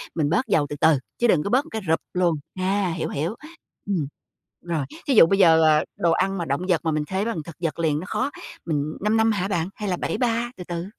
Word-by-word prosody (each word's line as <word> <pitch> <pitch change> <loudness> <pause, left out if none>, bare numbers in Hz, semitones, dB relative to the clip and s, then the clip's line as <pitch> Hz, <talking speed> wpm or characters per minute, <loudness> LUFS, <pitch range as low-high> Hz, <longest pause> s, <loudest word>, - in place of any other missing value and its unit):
mình 150 -3 +1
bớt 225 +9 +1
dầu 160 -9 +2
từ 145 - -4
từ 160 -2 +5 0.2
chứ 240 - +2
đừng 165 -9 +3
có - - -2
bớt 260 +7 +2
một - - -13
cái 220 - -3
rụp 160 - +2
luôn. 180 -2 +2 0.2
A, 190 0 +1
hiểu, 170 - -3
hiểu. 160 +9 -2 0.5
Ừm, 170 -8 0 0.5
rồi, 165 -5 -2 0.2
thí 275 - +3
dụ - - +9
bây 195 +4 +1
giờ, 165 -3 +6
ờ, 155 -1 +4
đồ 170 - +2
ăn 190 +3 +1
mà 170 - -2
động 140 +4 -1
vật 175 -3 +3
mà 160 - +2
mình 155 -1 0
thế 190 +2 -1
bằng 230 -7 -2
thực 170 - -10
vật 165 -1 -2
liền 155 -3 +1
nó 175 - -6
khó, 275 +3 -1 0.3
mình 155 -1 -2
5-5 220 +2 +3
hả 195 -2 -1
bạn? 175 -3 -1
Hay 210 -2 -4
là 180 - 0
7-3 240 +2 -1
từ 180 - -7
từ? 170 0 -4
175 Hz, 250 wpm, -24 LUFS, 160-205 Hz, 0.5 s, dụ